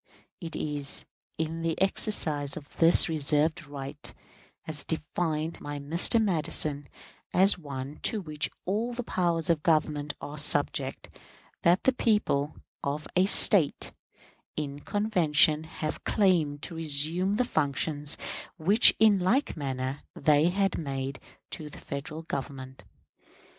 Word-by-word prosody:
It 165 -3 -6
is 145 -2 -3 0.3
in 160 +1 -3
the 165 -1 -2
exercise 155 -8 +1
of 145 -2 -12
this 165 +1 +6
reserved 155 0 0
right 140 +1 -6 0.5
as 155 -2 -4
defined 160 0 -3
by 145 0 -6
Mr. 165 +10 +4
Madison, 155 -7 0 0.5
as 190 +1 +4
one 140 -1 -7
to 220 - +3
which 150 -6 -2 0.2
all 220 +6 -2
the 245 +1 -4
powers 170 -6 -1
of 160 -3 0
Government 150 -2 0
are 150 +1 -7
subject, 145 -2 0 0.4
that 175 +3 +3
the 265 - +3
people 210 - 0 0.3
of 145 +2 -3
a 185 +1 +3
State 185 -6 +4 0.7
in 145 -2 -4
convention 160 -5 +2
have 155 -1 -6
claimed 165 -8 +1
to 170 - -4
resume 165 +5 +2
the 250 +3 +1
functions 145 - -1 0.4
which 200 +8 +5
in 215 -3 +4
like 230 +11 0
manner 130 -2 -4
they 150 +2 +3
had 195 0 0
made 135 -2 -4 0.3
to 155 -1 -6
the - - -12
Federal 155 +3 -7
Government.... 135 -3 -7
155 Hz, 125 wpm, -27 LUFS, 145-180 Hz, 0.7 s, this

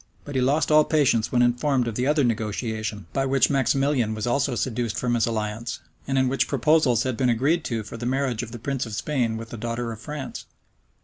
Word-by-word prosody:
[*] - - -34
But 145 - -7
he 130 - +1
lost 145 +5 +2
all 155 0 +7
patience 140 -8 +2
when 125 -1 +3
informed 125 +1 +1
of 115 - -2
the 125 +4 -1
other 150 0 +3
negotiation, 110 -2 -2
by 135 -1 0
which 135 +1 +3
Maximilian 135 -3 +1
was 110 - -3
also 130 +1 +1
seduced 120 -1 -2
from 125 -1 0
his 115 -1 +2
alliance, 110 +1 -3 0.3
and 135 - 0
in 130 0 +3
which 135 +2 +1
proposals 140 -3 +3
had 130 -2 -1
been 125 +1 +1
agreed 140 +8 +2
to 115 -3 -2
for 110 - -8
the 120 +1 -4
marriage 130 -3 0
of 120 - -6
the 120 - -6
prince 135 +1 -3
of 110 - -5
Spain 120 -4 -1
with 115 0 -8
the 120 - -6
daughter 115 +1 -3
of 110 - -8
France. 150 -2 -6
125 Hz, 230 wpm, -24 LUFS, 115-135 Hz, 0.3 s, all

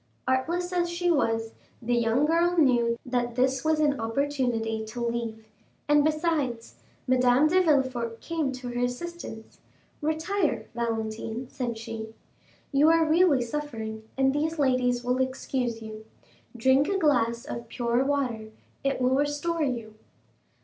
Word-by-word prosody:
Artless 340 +8 0
as 350 -1 +1
she 350 +1 0
was, 225 -7 0 0.3
the 245 +1 -2
young 235 +4 +2
girl 340 +3 +2
knew 240 -6 +3
that 240 -2 -1
this 260 +1 +1
was 315 0 +2
an 290 -4 +2
opportunity 225 -2 -1
to 220 +3 -7
leave, 230 -2 -3 0.4
and 295 0 +5
besides, 305 -7 -1 0.3
Madame 255 +2 +4
de 365 +4 +4
Villefort 260 -8 +1
came 320 -5 -2
to 255 -1 -6
her 245 0 -3
assistance. 245 -3 -6 0.4
"Retire, 315 +2 0
Valentine," 225 +1 -3
said 240 -3 -3
she; 225 0 -7 0.6
"you 290 +2 +5
are 330 0 +4
really 315 -5 +4
suffering, 230 -5 -5 0.2
and 270 0 +3
these 315 +3 -1
ladies 255 -3 +2
will 250 +1 0
excuse 260 -3 -2
you; 220 0 -8 0.5
drink 265 +4 +4
a 395 - +1
glass 240 -8 +2
of 235 -5 -6
pure 240 +2 0
water, 260 -6 -1 0.4
it 275 -1 0
will 255 +1 +3
restore 290 +4 0
you." 235 -6 -2
260 Hz, 140 wpm, -27 LUFS, 235-300 Hz, 0.6 s, and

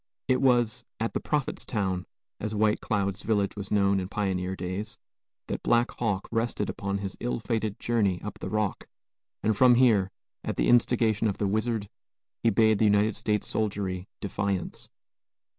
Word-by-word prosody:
It 130 0 +2
was 125 -2 +3 0.2
at 115 +1 -1
"the - - 0
prophet's 150 -3 -2
town," 95 -5 -2 0.3
as 110 0 -3
White 105 0 +2
Cloud's 100 -3 -1
village 105 -3 0
was 100 -2 -6
known 100 -1 +3
in 90 - -3
pioneer 95 -2 -1
days, 95 +4 -4 0.5
that - - -4
Black 120 0 +2
Hawk 105 -5 -2
rested 115 -2 -1
upon 100 0 -3
his 100 -1 -5
ill 120 0 -2
fated 110 -2 -2
journey 105 -6 +1
up 105 - -6
the - - -4
Rock, 105 -2 -1 0.6
and 110 0 +2
from 125 +2 +6
here, 110 -7 +4 0.3
at - - -3
the - - +2
instigation 115 -2 +3
of 100 - -1
the 105 - 0
wizard, 110 +1 0 0.5
he 115 - +4
bade 110 -1 +4
the 110 - +4
United 105 +1 +3
States 105 -2 0
soldiery 100 -3 -2
defiance. 100 -2 -2
105 Hz, 165 wpm, -28 LUFS, 100-115 Hz, 0.6 s, from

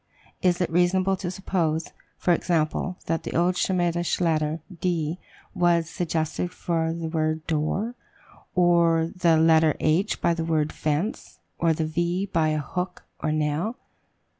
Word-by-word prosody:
Is 180 -1 +2
it 180 - 0
reasonable 185 +3 +3
to 180 - -4
suppose, 170 -4 -1 0.3
for 175 - +2
example, 170 +2 0
that 165 0 -1
the - - -6
old 175 +2 +2
Shemitish 175 -2 0
letter 160 -2 +1 0.2
D 170 -2 -1 0.3
was 170 -2 +2
suggested 165 0 -1 0.2
by 165 -1 +1
the 165 0 -4
word 155 -1 -1
door, 165 +9 -1 0.6
or 170 -2 +3
the 170 -3 +4
letter 160 -1 +4
H 175 +7 +1
by 170 - +2
the 165 -1 -2
word 155 -2 0
fence, 150 - -2 0.2
and 165 -2 +2
the 160 - 0
V 175 +4 -1
by 165 -5 +1
a 155 0 +1
hook 180 +5 -4 0.2
or 155 - -1
nail? 155 +8 -1
165 Hz, 145 wpm, -25 LUFS, 155-180 Hz, 0.6 s, the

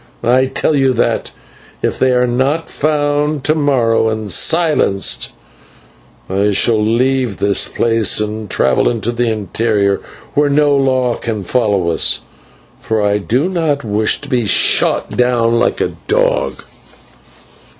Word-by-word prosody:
I 130 +2 +3
tell 150 - 0
you 135 -2 +2
that, 120 - -1 0.5
if - - -1
they 130 - +2
are 125 0 +2
not 130 +7 -1
found 145 -1 -1
to 155 - +2
morrow 125 -7 +1
and 110 -2 -3
silenced, 155 - +1 0.9
I 100 +2 0
shall 105 +2 +2
leave 125 0 0
this 100 -1 +1
place 115 -3 +1
and 105 0 -4
travel 65 - +1
into 115 0 -2
the 120 0 -1
interior, 105 -1 -1 0.3
where 145 0 +2
no 145 0 +2
law 130 -3 +1
can 110 -4 -4
follow 100 -5 0
us, - - +1 0.6
for 110 -1 -2
I 105 0 +1
do 125 - 0
not 160 -6 -1
wish 105 0 0
to 145 - -7
be 120 -5 0
shot - - +2
down 120 -2 +1
like - - 0
a - - -1
dog. - - 0
120 Hz, 140 wpm, -15 LUFS, 110-140 Hz, 0.9 s, I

